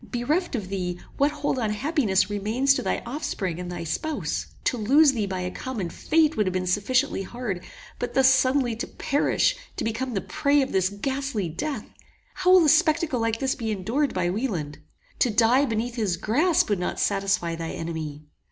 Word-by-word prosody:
Bereft 295 +7 -1
of 200 -6 -4
thee, 180 -2 -3 0.2
what 285 +1 +4
hold 290 -3 -2
on 220 -3 0
happiness 210 - +1
remains 215 +7 +1
to 265 - -1
thy 195 - -2
offspring 220 - -3
and 180 0 -5
thy 175 -1 -5
spouse? 300 - -3 0.2
To - - +1
lose 275 +7 +5
thee 220 -6 -2
by 185 -1 -3
a 180 0 -3
common 210 -10 -4
fate 320 - +2
would 210 -6 +1
have 185 - -1
been 185 0 -1
sufficiently 210 +7 +1
hard; 195 -3 -5 0.4
but 245 - -4
thus 265 -1 +6
suddenly 260 -2 +3
to - - -4
perish 305 - +1 0.2
to - - -2
become 230 +2 -2
the 195 - 0
prey 290 -2 +2
of 265 - -5
this 185 -1 +2
ghastly 250 -2 -3
death! 275 - -4 0.5
How 370 -1 0
will 370 -3 +7
a - - +5
spectacle 315 -3 +3
like 225 0 0
this 265 +2 0
be 225 -2 -4
endured 225 +9 0
by 175 -1 +1
Wieland? 180 - -3 0.4
To 250 - +3
die 235 +5 +4
beneath 235 0 -2
his 200 -6 0
grasp 295 - +2
would 200 - +1
not 180 - -3
satisfy 195 -4 0
thy 165 0 -5
enemy. 155 -3 -5
230 Hz, 190 wpm, -25 LUFS, 190-280 Hz, 0.5 s, will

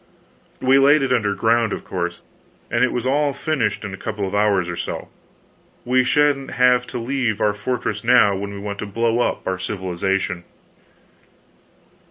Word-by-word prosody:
We 130 +1 +4
laid 140 +1 +5
it 130 -1 +1
under 105 -5 +1
ground, 115 -1 +2
of - - -6
course, 85 -1 -4 0.5
and 120 +1 +2
it 125 - +2
was 125 0 -3
all 145 +2 +1
finished 140 -6 -1
in 100 - -6
a - - -6
couple 105 -2 -4
of 95 - -6
hours 100 -3 +2
or 85 - -4
so. 85 - -5 0.8
We 130 +1 +3
sha'n't 145 0 +1
have 125 -1 +3
to - - -5
leave 120 -2 -1
our 105 -2 +2
fortress 105 -1 -3
now 115 -4 +5
when 100 +1 -4
we 100 - -7
want 100 0 -6
to 105 - -4
blow 115 +3 0
up - - -1
our 95 -1 -2
civilization." 95 -1 -2
115 Hz, 175 wpm, -21 LUFS, 100-125 Hz, 0.8 s, laid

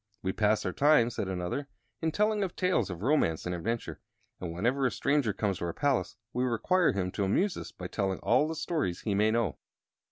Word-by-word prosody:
"We 95 0 -1
pass 105 0 +2
our - - -1
time," 145 -5 +4
said 100 - -3
another, 95 +9 -3 0.3
"in 160 -1 +1
telling 210 +4 +1
of 185 - -4
tales 180 - +1
of 90 +1 -6
romance 120 - +2
and 90 - -2
adventure; 115 +7 -3 0.4
and, 90 -2 -4
whenever 125 +10 +1
a - - -2
stranger 140 -2 +1
comes 100 -2 -1
to - - -2
our 85 - -3
palace, 140 -5 0 0.2
we 125 - 0
require 160 +9 +2
him 95 -2 -2
to 100 - -2
amuse 175 - +1
us - - -7
by 90 - -9
telling 95 -1 -1
all 130 +6 +3
the 160 - -3
stories 155 - -2
he 105 - -1
may 105 +2 +3
know." 110 -8 0
115 Hz, 215 wpm, -30 LUFS, 95-150 Hz, 0.4 s, time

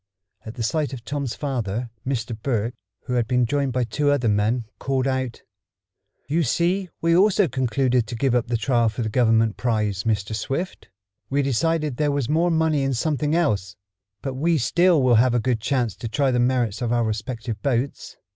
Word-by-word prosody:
At 110 - -7
the 120 - -3
sight 145 +4 -1
of 120 -3 -8
Tom's 140 -5 -3
father, 120 -5 -3 0.2
Mr. 120 -3 -2
Berg, 115 -2 -1 0.3
who 125 - -4
had 120 -2 +1
been 125 0 +2
joined 140 +2 0
by 125 0 0
two 145 +5 0
other 140 -5 +2
men, 110 +3 +1
called 135 -1 0
out: 130 -3 -2 0.8
"You 160 +4 +1
see 175 +6 0
we 165 0 +3
also 200 0 +4
concluded 125 -2 +1
to 120 - -5
give 130 +2 +1
up 125 -1 +1
the 120 0 0
trial 120 -1 +2
for 110 +2 -4
the 110 - -2
Government 115 -2 +2
prize, 105 -5 0
Mr. 110 -1 -1
Swift. 135 - -4 0.4
We 140 +1 +1
decided 150 +1 0
there 150 -1 +1
was 140 -4 -1
more 165 +3 +2
money 160 -3 +2
in 135 -1 0
something 150 +4 0
else. 100 - 0 0.5
But 135 -2 -3
we 160 +5 +1
still 170 +3 +3
will 125 -2 +5
have 125 -1 +2
a - - +3
good 115 -1 0
chance 125 -5 0
to 115 - -5
try 135 +3 +1
the 125 - +1
merits 120 -3 +1
of 120 -1 -1
our 120 -1 +2
respective 110 +1 -4
boats. 135 -1 -2
125 Hz, 195 wpm, -23 LUFS, 115-145 Hz, 0.8 s, will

